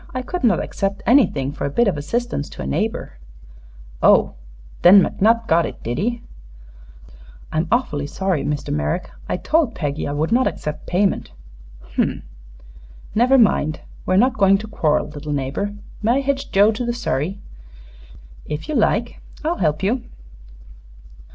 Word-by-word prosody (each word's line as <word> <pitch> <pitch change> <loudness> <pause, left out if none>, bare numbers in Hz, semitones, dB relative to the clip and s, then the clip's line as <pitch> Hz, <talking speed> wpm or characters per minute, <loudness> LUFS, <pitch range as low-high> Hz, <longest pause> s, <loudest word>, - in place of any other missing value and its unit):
I 255 - -2
could 360 +5 -5
not 235 - +4
accept 195 0 -3
anything 190 - +3
for - - -4
a - - -1
bit 235 +11 +2
of 190 - +1
assistance 150 +2 -3
to - - -8
a - - -5
neighbor." 65 -2 -3 0.8
"Oh! - - +5 0.5
Then 190 +2 +8
McNutt 230 +3 +2
got 165 0 +3
it, - - -10
did 120 +4 -3
he?" 235 +4 -2 1.3
"I'm 160 +2 0
awfully 150 - 0
sorry, 185 -1 -1
Mr. 145 0 -2
Merrick. 160 +4 -2 0.2
I - - 0
told 310 - +1
Peggy 145 -3 -3
I - - -3
would 150 +3 -1
not 255 +3 +3
accept 150 0 -5
payment." 190 +2 0 0.6
"H - - -7
m. - - 0 0.9
Never 250 +4 +4
mind. 160 - +2 0.3
We're 185 - +2
not 245 +2 +3
going 195 0 +5
to 215 +2 -8
quarrel, 155 -8 0
little 150 0 -6
neighbor. 145 +10 -2 0.3
May 225 +2 +2
I 275 - +1
hitch 275 0 -2
Joe 205 +3 +5
to 225 +3 -4
the 240 0 -1
surrey?" 190 - -2 1.1
"If 150 - -5
you 310 - -3
like. 235 -2 0 0.2
I'll 340 +2 0
help 155 +4 0
you." 235 +6 +1
195 Hz, 160 wpm, -21 LUFS, 150-235 Hz, 1.3 s, Then